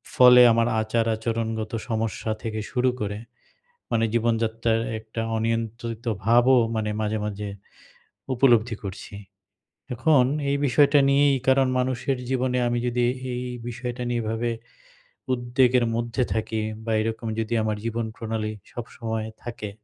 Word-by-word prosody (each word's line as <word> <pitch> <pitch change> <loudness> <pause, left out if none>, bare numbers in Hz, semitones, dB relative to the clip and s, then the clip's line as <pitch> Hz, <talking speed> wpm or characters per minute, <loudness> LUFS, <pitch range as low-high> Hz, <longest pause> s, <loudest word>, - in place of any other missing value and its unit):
ফলে 125 -1 +8
আমার 115 +1 +3
আচার 115 +1 0
আচরণগত 110 -1 -3 0.2
সমস্যা 110 0 -2
থেকে 110 -1 -3
শুরু 125 0 +2
করে 105 0 -2 0.7
মানে 115 0 +2
জীবনযাত্রার 115 0 +1 0.2
একটা 110 +1 -7 0.2
অনিয়ন্ত্রিত 115 +1 -3 0.2
ভাবও 120 +3 +5 0.2
মানে 110 -1 -1
মাঝে, 110 0 -1
মাঝে 105 0 -4 0.9
উপলব্ধি 120 -3 +3
করছি। 100 +1 -7 0.8
এখন 130 +1 +4 0.3
এই 140 - +2
বিষয়টা 145 +2 +4
নিয়েই 140 0 +4
কারণ 135 0 +5
মানুষের 130 +1 0
জীবনে 130 -1 0
আমি 120 - 0
যদি 120 0 +1 0.3
এই 125 - -3 0.3
বিষয়টা 125 +1 -5
নিয়ে 120 -1 0
এভাবে 115 +2 -1 0.8
উদ্বেগের 125 0 +2
মধ্যে 120 +2 -1
থাকি 110 0 -2 0.2
বা 115 - -2
এরকম 115 +1 -3
যদি 110 +1 -2
আমার 110 -1 -1
জীবন 115 0 -2
প্রণালী 110 -1 -3 0.2
সবসময় 110 -2 -5 0.2
থাকে, 115 -3 -6
115 Hz, 125 wpm, -25 LUFS, 110-125 Hz, 0.9 s, ফলে